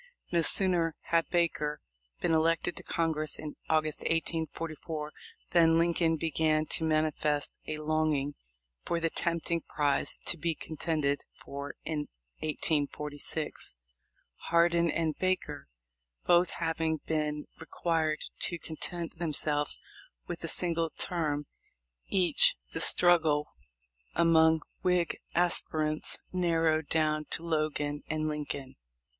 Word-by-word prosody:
No 170 -1 +3
sooner 170 -2 +6 0.2
had 165 -1 +3
Baker 155 -4 0 0.4
been 165 - +1
elected 165 +2 +2
to - - -8
Congress 155 -2 -1
in 150 -1 -7
August, 155 -1 +1
1844, 160 -1 -3 0.4
than 165 -1 +5
Lincoln 165 -1 +2
began 155 -1 +1
to 160 - -1
manifest 155 -2 0
a 155 - -3
longing 155 -2 0 0.5
for 170 - -1
the 165 -1 0
tempting 170 0 -1
prize 145 -2 +1
to 170 - +1
be 165 +1 -1
contended 150 -2 -1 0.2
for 140 +1 -6
in 150 -2 -2 0.3
1846. 150 - -2 0.7
Hardin 170 0 +4
and 160 -1 0
Baker 185 - -1 0.6
both 175 +1 +5
having 165 -1 -1
been 150 -1 -1
required 160 -1 -1
to 170 - -1
content 165 +1 -6
themselves 150 -2 -1 0.5
with 175 -1 -6
a - - -2
single 165 -1 +1
term 150 -4 -1 0.6
each, 200 - +5 0.2
the - - -2
struggle 160 -4 +4 0.7
among 160 -1 +5 0.2
Whig 180 -2 +1 0.2
aspirants 155 -3 0 0.2
narrowed 165 -3 +1
down 155 -1 +1
to 165 - -1
Logan 155 -2 -1
and 155 0 -1
Lincoln. 145 -3 -4
160 Hz, 110 wpm, -30 LUFS, 150-170 Hz, 0.7 s, sooner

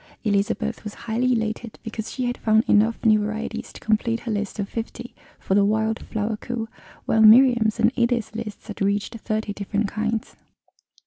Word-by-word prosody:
Elizabeth 220 +1 0
was 210 -1 -7
highly 240 +3 +1
elated 220 0 -3
because 225 -1 -5
she 255 - -2
had 245 0 -1
found 220 -1 +3
enough 220 +3 +3
new 215 -1 +6
varieties 215 +2 -4
to - - -12
complete 230 +1 0
her 235 - -4
list 205 0 -3
of 200 -2 -2
fifty 235 +2 -6 0.2
for - - -2
the 200 +1 +5
Wild 220 +2 +1
Flower 215 0 -2
coup, 235 0 -4 0.4
while 220 - +2
Miriam's 230 0 +6
and 225 +1 +4
Edith's 235 -3 0
lists 220 -2 -7
had 210 - -8
reached 205 +3 -1
thirty 215 -1 -2
different 205 +1 -2
kinds. 220 +2 -3
220 Hz, 175 wpm, -23 LUFS, 210-230 Hz, 0.4 s, new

